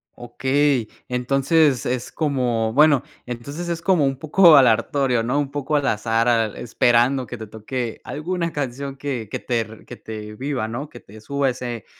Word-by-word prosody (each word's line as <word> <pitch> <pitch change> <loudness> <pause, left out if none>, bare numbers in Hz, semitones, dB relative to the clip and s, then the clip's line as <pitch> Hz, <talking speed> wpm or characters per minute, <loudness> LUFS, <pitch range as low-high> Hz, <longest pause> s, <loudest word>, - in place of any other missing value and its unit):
Okey, 130 0 0 0.2
entonces, 135 +2 +2
es 125 0 -2
como, 125 -7 0
bueno 145 0 +5 0.2
entonces, 140 +8 -6
es 170 -1 -3
como 170 -5 +3
un 135 -1 -1
poco 160 +3 +6
aleatorio, 130 0 +3
¿no? 125 +5 -1
Un 140 -2 -2
poco 145 +1 -2
al 145 -1 +1
azar, 115 +1 +1
al 115 -3 +2
esperando 120 +2 +2
que 125 - -7
te 110 - -7
toque 110 +2 -5
alguna 170 +3 -3
canción 140 -2 -4
que 130 -6 -4
que - - -4
te 115 -3 -3
que - - -9
te 105 -1 -8
viva, 130 -2 -3
¿no? 125 +7 -5
Que 120 - -12
te 110 0 -15
suba 140 +4 0
ese 120 -2 -5
130 Hz, 170 wpm, -22 LUFS, 115-145 Hz, 0.2 s, poco